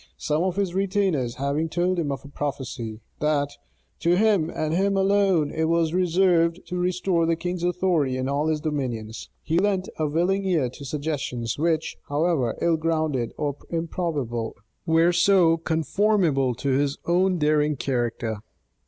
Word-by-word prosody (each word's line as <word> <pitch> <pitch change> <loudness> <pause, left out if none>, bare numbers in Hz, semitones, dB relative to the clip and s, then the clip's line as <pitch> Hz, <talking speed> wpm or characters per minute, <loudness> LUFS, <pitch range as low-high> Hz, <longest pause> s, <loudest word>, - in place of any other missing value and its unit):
Some 150 +1 0
of 185 -1 0
his 195 -3 -1
retainers 190 -10 0
having 140 +4 -1
told 180 +2 0
him 150 -4 -1
of 135 0 -5
a - - -8
prophecy, 130 -6 -5 0.2
that 145 -2 +1 0.5
"to 170 +1 +3
him 200 -5 +3
and 155 -2 -2
him 195 +3 +1
alone 195 -6 +2
it 160 0 0
was 165 0 +1
reserved 175 -1 +3
to 180 - -3
restore 180 -1 +1
the 165 - +2
king's 175 +1 -4
authority 175 -7 +1
in 130 0 -2
all 140 +3 0
his 155 -1 +1
dominions," 120 -8 -4
he 165 +2 +1
lent 195 -1 0
a 155 - +1
willing 175 +6 +1
ear 165 -9 +1
to 140 +3 -11
suggestions 140 -5 -3
which, 160 0 0
however 145 -5 0
ill 170 -1 +3
grounded 155 -6 -1
or 145 -2 -2
improbable, 155 -9 -2 0.3
were 165 +2 +4
so 175 -2 +4
conformable 160 - +1
to 140 +4 -3
his 140 +1 +1
own 180 +2 +2
daring 150 -1 +2
character. 120 -4 -2
160 Hz, 155 wpm, -24 LUFS, 140-180 Hz, 0.5 s, were